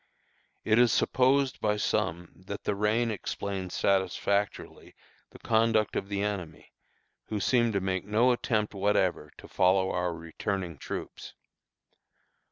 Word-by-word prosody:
It 110 +1 +3
is 120 -2 +5
supposed 130 +2 +2
by 105 -1 +1
some 85 -4 -1 0.2
that 100 - -6
the - - 0
rain 110 +3 +1
explains 100 -3 -4
satisfactorily 100 +1 -1 0.3
the - - -14
conduct 110 -1 +1
of 100 - -3
the 100 0 -1
enemy, 90 -7 -5 0.6
who 105 - -3
seemed 120 +1 +2
to 100 - 0
make 95 0 -2
no 110 +5 +3
attempt 110 -3 -1
whatever 95 -6 0
to - - -12
follow 95 +1 +2
our 90 -1 -1
returning 85 0 -4
troops. - - -7
100 Hz, 130 wpm, -28 LUFS, 95-110 Hz, 0.6 s, is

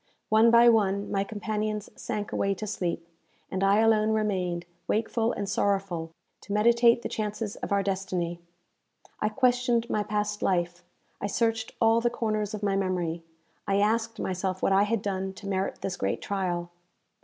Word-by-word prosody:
One 220 +2 +6
by 235 +1 +7
one, 200 -3 +3
my 195 0 +1
companions 215 0 -3
sank 210 0 -4
away 195 0 0
to 215 - -5
sleep, 175 -5 -3 0.4
and 190 0 -1
I 195 +1 +4
alone 220 -1 +4
remained, 185 -5 -1 0.2
wakeful 225 +1 0
and 200 -4 -3
sorrowful, 195 -5 0 0.3
to 200 - -6
meditate 235 +2 +4
the - - -1
chances 210 0 -3
of - - -6
our 200 0 +2
destiny. 185 -3 -2 0.8
I 215 - +1
questioned 245 0 +2
my 210 - +1
past 210 0 -2
life; 175 -1 0 0.4
I - - -1
searched 225 +2 0
all 225 0 +4
the 240 - +2
corners 215 -3 -2
of 210 - -8
my 200 -1 +1
memory; 180 -4 -1 0.5
I 195 - +2
asked 225 +2 +1
myself 185 0 -2
what - - +3
I 195 +1 +5
had 220 -1 -1
done 190 -1 -2
to 200 +1 -10
merit 190 -1 -2
this 195 - -3
great 95 - -1
trial? 175 -3 -2
205 Hz, 165 wpm, -27 LUFS, 190-220 Hz, 0.8 s, by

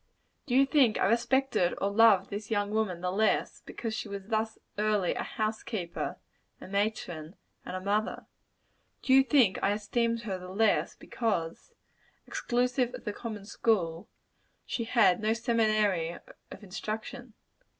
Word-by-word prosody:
Do 250 - 0
you 270 +1 +6
think 270 -6 +3
I - - +2
respected 235 -3 +2
or 200 - 0
loved 205 -3 +5
this 205 +1 -5
young 205 -2 0
woman 210 -5 -1
the 180 0 -1
less, 215 +3 +1
because 225 -2 -5
she 220 - -4
was 200 -1 -6
thus 220 0 -1 0.2
early 210 -4 +1
a - - -3
house 215 0 -2
keeper, 175 -7 -4 0.4
a - - -10
matron, 190 -5 -2 0.3
and - - -6
a 185 - -4
mother? 205 +3 -1 0.8
Do 260 - +3
you 270 - +8
think 250 -7 +3
I 200 - +2
esteemed 230 +2 -1
her 195 -5 -3
the 180 0 -9
less, 215 +4 +1
because 180 -9 -3 0.5
exclusive 250 0 0
of 250 - -11
the 210 - -2
common 215 -3 -7
school 185 -6 0 0.6
she 230 - -3
had 220 -6 +4
no 215 +1 +2
seminary 215 -7 +1 0.3
of 200 - -11
instruction? 215 +4 -6
215 Hz, 150 wpm, -29 LUFS, 195-230 Hz, 0.8 s, you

